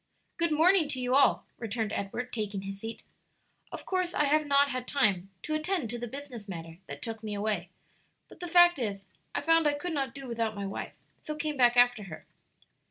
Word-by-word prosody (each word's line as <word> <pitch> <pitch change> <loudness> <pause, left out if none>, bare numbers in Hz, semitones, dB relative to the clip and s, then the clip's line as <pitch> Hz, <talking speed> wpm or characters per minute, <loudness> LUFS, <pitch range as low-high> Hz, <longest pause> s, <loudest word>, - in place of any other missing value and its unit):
"Good 335 -1 +1
morning 325 +2 +5
to 265 -3 -2
you 250 0 0
all," 280 +1 +4
returned 220 -2 -2
Edward, 240 +6 -4
taking 205 -3 -3
his 195 0 -6
seat. 225 +2 -7 0.7
"Of - - -7
course 365 -2 -1
I - - +3
have 300 +1 +2
not 280 0 +4
had 255 -1 -4
time 200 -9 +2
to 310 - -3
attend 310 - -1
to 240 - -4
the 240 - -4
business 245 -5 -8
matter 165 -2 -7
that 145 0 -7
took 225 -1 -5
me 215 -2 -4
away; 200 -4 -1 0.6
but - - -16
the 355 - -5
fact 350 -2 +6
is, 200 -4 -3 0.3
I - - 0
found 330 +1 +4
I 290 - +2
could 330 +4 -4
not 270 -5 -2
do 275 -1 -8
without 230 -2 -2
my 200 -1 -4
wife, 195 - -5 0.3
so 305 - -4
came 300 0 -2
back 245 -2 +4
after 245 -4 +4
her." 165 -5 -10
245 Hz, 210 wpm, -29 LUFS, 210-300 Hz, 0.7 s, fact